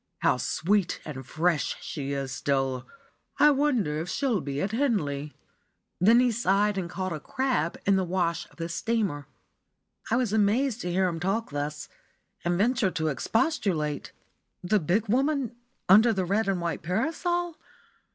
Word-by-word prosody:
How - - +3
sweet 195 +1 0
and 135 -4 -6
fresh 160 -1 0
she 140 -3 -5
is 135 -1 -3
still! 135 -2 -1 0.5
I 300 - +6
wonder 250 - +1
if 165 +3 -4
she'll 250 -5 0
be 140 0 -4
at 195 +6 -1
Henley?" 150 - -1 0.6
Then 225 +6 +6
he 250 -1 +3
sighed 210 -2 +2
and 185 -3 -3
caught 185 0 -3
a 155 - -4
"crab" 250 - -1
in 195 -1 +4
the 190 - +1
wash 175 -2 -1
of - - -22
the 165 -1 -4
steamer. 170 -5 -1 0.8
I 230 - +2
was 240 -4 0
amazed 225 +4 +2
to 180 - -3
hear 185 +1 +2
him 165 -2 -3
talk 195 +5 -1
thus, 145 +1 -4 0.6
and 175 0 +1
ventured 220 -2 +1
to 160 -2 0
expostulate. 165 - -1 0.5
"The 205 +4 +2
big 195 +7 0
woman 265 +1 +1 0.3
under 215 +5 +7
the 190 -3 -1
red 200 +4 +1
and 195 -2 +1
white 170 -1 -2
parasol? 330 - -1
190 Hz, 160 wpm, -27 LUFS, 160-230 Hz, 0.8 s, under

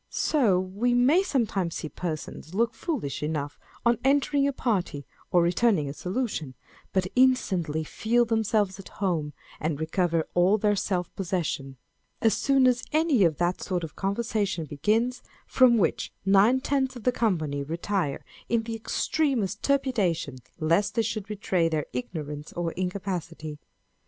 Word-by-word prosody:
So 230 -12 +2
we 205 +7 0
may 270 +9 +5
sometimes 215 - -1
sec 155 - -5
persons 160 0 -5
look 230 +2 +2
foolish 230 - -3
enough 150 -1 -3 0.3
on 235 -1 +3
entering 280 +1 +3
a - - +1
party, 190 - -1 0.2
or 175 -1 +4
returning 180 -2 +2
a 140 - -4
salutation, 180 - -3 0.4
who 190 - +2
instantly 190 - +2
feel 235 +9 +1
themselves 215 -3 +1
at 195 - -10
home, 165 -7 -1 0.3
and 155 -2 -2
recover 165 0 0
all 180 +4 +4
their 210 0 +2
self 185 -3 -2
possession, 165 -8 -3 0.4
as 225 -1 +3
soon 275 -1 +3
as 250 -1 +3
any 310 -8 +3
of 160 -4 +2
that 175 +1 0
sort 180 -2 -2
of 160 - -7
conversation 200 -3 -1
begins 220 - 0 0.2
from 250 -3 +5
which 200 - 0
nine 200 +7 +5
tenths 265 -1 0
of 240 - -9
the 250 - +3
company 160 -12 0
retire 165 +1 -2 0.2
in 230 0 +2
the 225 0 -5
extremest 225 -2 -1
trepidation 205 - 0 0.2
lest 170 +7 +1
the}r 230 - +2
should 215 -2 -3
betray 190 -5 0
their 155 -2 -1
ignorance 150 +3 -5
or 170 -1 -2
incapacity. 180 -5 -4
195 Hz, 145 wpm, -27 LUFS, 165-235 Hz, 0.4 s, may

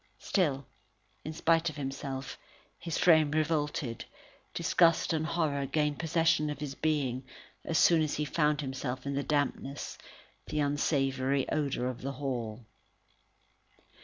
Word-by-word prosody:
Still, 145 -8 0 0.6
in 155 - -4
spite 165 +1 +2
of 155 - -9
himself, 135 -2 -5 0.4
his 165 -2 -3
frame 160 -4 +5
revolted, 150 -5 -1 0.5
disgust 165 -1 +3
and 160 0 0
terror 150 -5 0
gained 150 -1 0
possession 160 -1 +2
of 150 - -4
his 145 -2 -4
being, 140 -4 0 0.4
as 165 - 0
soon 165 0 +5
as 155 -2 0
ever - - -2
he 150 - 0
found 150 0 +1
himself 130 -2 -4
in 140 - -2
the 140 - 0
dampness, 145 -1 -2 0.5
and 150 - -4
unsavoury 135 -2 +1
odour 140 -5 0
of 125 -1 -3
the 135 +1 -3
hall. 120 -5 -4
145 Hz, 135 wpm, -30 LUFS, 135-155 Hz, 0.6 s, frame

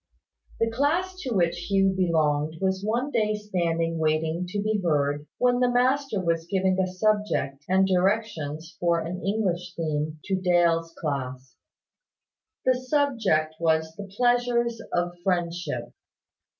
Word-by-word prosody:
The 225 0 +1
class 325 +10 0
to 265 - -4
which 175 -1 0
Hugh 195 -1 +3
belonged 155 -4 +1
was 190 0 0
one 240 +7 -1
day 215 -3 +1
standing 170 -5 -1
waiting 160 +2 0
to 185 - -4
be 210 0 0
heard, 145 -2 0
when 245 0 +3
the 250 -1 +3
master 255 -1 +1
was 165 -2 -1
giving 190 -1 +1
a 190 - +2
subject 185 -8 0
and 190 +1 +4
directions 180 -5 -1
for 170 -1 +2
an 175 +3 -5
English 180 -4 -1
theme 155 -1 -2
to 190 -2 -1
Dale's 170 -2 +2
class. 130 -3 -4 1.1
The 255 - +5
subject 245 - +1
was 160 -1 +1
the 200 +2 -7
Pleasures 240 -1 +2
of 175 0 0
Friendship. 170 -9 -2
180 Hz, 135 wpm, -26 LUFS, 160-215 Hz, 1.1 s, The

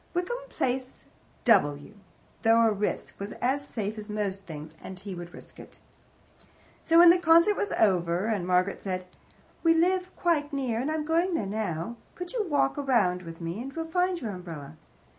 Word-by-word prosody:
Wickham 360 +8 -1
Place, 255 0 -3 0.4
W., 145 +6 +3 0.5
though 225 +1 +5
a 225 - +4
risk, 205 0 -2
was 200 +1 -5
as 275 +3 -1
safe 215 -1 -4
as 210 0 -9
most 200 -2 -3
things, 155 -1 -8
and 185 -1 -8
he 195 0 -7
would 175 -1 -8
risk - - -12
it. - - -13 1.0
So 330 - +3
when 340 0 +10
the 355 - +3
concert 335 +4 +5
was 410 - -2
over 180 -2 +2
and 205 -6 -1
Margaret 185 +2 +1
said, 185 -2 -3 0.6
"We 330 -1 +4
live 365 +2 +2
quite 315 -4 +1
near; 260 -5 -1
I - - 0
am 310 -1 -2
going 335 +3 +1
there 215 - -1
now. 200 0 -3 0.2
Could 360 -1 -6
you 440 -5 -1
walk 285 -2 +1
around 225 -10 +2
with 165 -1 -10
me, 170 +6 -4
and 270 +2 -6
we'll 325 0 -3
find 360 +2 0
your 225 -7 -4
umbrella?" 165 -6 -8
225 Hz, 180 wpm, -28 LUFS, -, 1.0 s, when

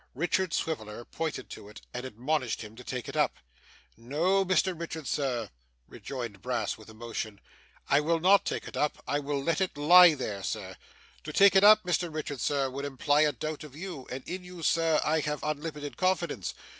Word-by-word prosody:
Richard 175 +4 0
Swiveller 120 -9 -3
pointed 160 -1 -4
to 100 - -9
it, 105 - -12
and 125 - -4
admonished 130 +1 -2
him 110 0 -11
to 125 - -11
take 125 -1 -5
it - - -7
up. - - +2 0.6
'No, 160 - +1
Mr 185 0 +2
Richard, 165 -2 -6
sir,' 125 -9 -2 0.4
rejoined 120 -8 -7
Brass 125 +1 -1
with 110 0 -15
emotion, 110 -2 -6 0.5
'I 140 - +4
will 165 +2 +1
not 190 +4 +5
take - - -3
it - - -9
up. 150 - -1
I 145 - +1
will 140 -1 -2
let 165 +5 0
it 185 -5 -1
lie 170 +2 +8
there, 105 -7 -4
sir. 90 - -4 0.5
To 155 - -6
take 195 +4 +6
it 190 - +6
up, 215 +1 +8
Mr 175 -1 0
Richard, 150 -3 -4
sir, 140 -2 +1
would 135 +2 -5
imply 145 +1 +1
a 150 -1 +4
doubt 155 +4 -5
of 145 -3 -11
you; 165 -5 -7
and 130 +1 -7
in 180 +1 -5
you, 180 -2 -10
sir, 165 -1 +3
I 160 +1 +2
have 150 -1 -3
unlimited 150 -1 -4
confidence. 175 - -1
150 Hz, 195 wpm, -29 LUFS, 125-170 Hz, 0.6 s, lie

